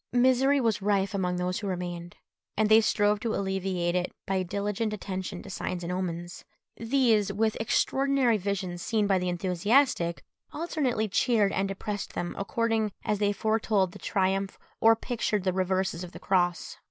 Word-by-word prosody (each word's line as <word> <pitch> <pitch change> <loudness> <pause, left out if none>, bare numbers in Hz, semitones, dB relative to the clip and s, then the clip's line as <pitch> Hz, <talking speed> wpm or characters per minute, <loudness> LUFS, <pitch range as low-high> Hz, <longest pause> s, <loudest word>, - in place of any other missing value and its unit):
Misery 260 +3 +4
was 225 -5 +1
rife 200 -1 +1
among 180 -2 0
those 180 +2 -1
who 205 - -5
remained, 175 -2 -5 0.4
and 215 0 +2
they 220 +1 +7
strove 210 -1 +2
to 225 0 -2
alleviate 190 -3 -1
it 180 0 -1
by 195 - 0
a 185 - 0
diligent 205 +4 -2
attention 190 -2 -5
to - - -10
signs 180 -1 -4
and 170 - -3
omens. 175 -1 -4 0.3
These, 230 -4 +2
with 215 +2 0
extraordinary 265 +1 +2
visions 185 -3 -3
seen 215 +2 +1
by 195 -2 +2
the 180 0 -1
enthusiastic, 180 - +1 0.3
alternately 285 -9 -1
cheered 210 0 +2
and 195 +1 0
depressed 200 +1 -5
them 175 - -3
according 225 0 0
as 210 -1 0
they 205 -1 +2
foretold 210 -2 +1
the - - -12
triumph 195 +1 0 0.2
or 225 0 +6
pictured 225 -4 -2
the 185 -1 +1
reverses 185 -1 -1
of 180 - -9
the - - -9
cross. 175 -2 0
200 Hz, 165 wpm, -28 LUFS, 185-220 Hz, 0.4 s, they